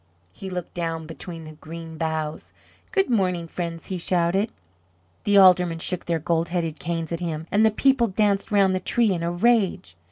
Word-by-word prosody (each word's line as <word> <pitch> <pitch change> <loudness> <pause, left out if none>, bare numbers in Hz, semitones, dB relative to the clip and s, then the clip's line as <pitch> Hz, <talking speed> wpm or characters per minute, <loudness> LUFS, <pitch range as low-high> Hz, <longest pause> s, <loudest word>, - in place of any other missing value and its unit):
He 190 - -8
looked 180 -2 -5
down 165 -2 -3
between 165 +1 -8
the 155 - -9
green 160 +1 -9
boughs. 160 -1 -3 0.4
"Good 390 -3 +2
morning, 180 -6 +1
friends!" 165 -1 -5
he 185 -2 -4
shouted. 180 +4 +1 0.7
The 205 -1 +4
Aldermen 180 -3 +6
shook 180 +2 -2
their 170 -1 0
gold 165 +1 0
headed 165 -3 -2
canes 165 0 -3
at 170 - -2
him, 160 -3 -4
and 210 +3 +3
the 220 - +6
people 250 +2 +3
danced 200 0 0
round 195 -2 +4
the 185 - 0
tree 225 +3 +2
in 170 - -3
a 170 0 -1
rage. 190 - +1
175 Hz, 185 wpm, -24 LUFS, 165-195 Hz, 0.7 s, Aldermen